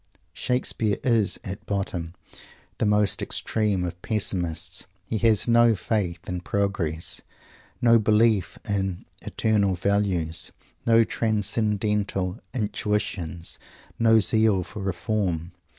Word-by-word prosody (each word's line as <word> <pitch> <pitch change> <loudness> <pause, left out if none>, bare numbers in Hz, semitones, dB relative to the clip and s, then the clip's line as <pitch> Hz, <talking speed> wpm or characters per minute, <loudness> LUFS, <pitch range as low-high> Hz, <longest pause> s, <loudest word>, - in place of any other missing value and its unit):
Shakespeare 115 -4 0
is, 115 -5 +2
at 100 +2 -6
bottom, 90 -4 -3 0.6
the 110 - +2
most 105 -1 +2
extreme 105 -4 0
of 90 0 -5
Pessimists. 90 -5 -1 0.2
He 110 +1 -2
has 110 -1 +3
no 120 -1 +5
faith 90 -3 -2
in 90 -1 -3
"progress," 90 -5 -1 0.6
no 115 -1 +6
belief 110 -3 +2
in 95 -3 -2 0.2
"eternal 100 -4 +1
values," 90 -4 0 0.4
no 115 0 +6
transcendental 105 -3 0
"intuitions," 105 -7 -2 0.4
no 115 -1 +5
zeal 110 -1 +3
for 105 - -8
reform. 95 -3 -2
100 Hz, 105 wpm, -25 LUFS, 90-110 Hz, 0.6 s, no